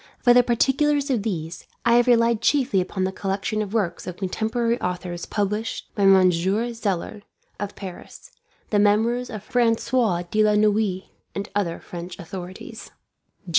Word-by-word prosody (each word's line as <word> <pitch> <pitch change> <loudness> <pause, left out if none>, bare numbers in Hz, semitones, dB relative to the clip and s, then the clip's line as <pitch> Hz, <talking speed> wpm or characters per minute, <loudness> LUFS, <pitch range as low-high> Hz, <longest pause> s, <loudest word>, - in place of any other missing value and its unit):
For 245 - +5
the 245 - +7
particulars 275 +4 +1
of 240 -5 +1
these, 175 -6 -4 0.2
I 235 - +5
have 240 +1 +3
relied 230 -2 +3
chiefly 260 -9 +2
upon 185 +1 -3
the 190 - 0
collection 195 +2 -2
of 205 -2 -4
works 205 -6 -2
of 180 -1 -6
contemporary 225 +5 -1
authors 180 -1 -4
published 210 +2 -3
by 200 - +1
Monsieur 190 +5 +3
Zeller, 205 -2 -3 0.4
of 205 0 -5
Paris; 185 -3 -10 0.4
the 210 - +3
Memoirs 225 +4 +2
of 215 -4 -7
Francois 230 -5 +1
de 215 0 +3
la 210 0 +3
Noue, 210 -2 +2 0.3
and 200 0 -4
other 180 -5 -1
French 175 +1 -8
authorities. 185 +6 -8
210 Hz, 150 wpm, -23 LUFS, 185-235 Hz, 0.4 s, the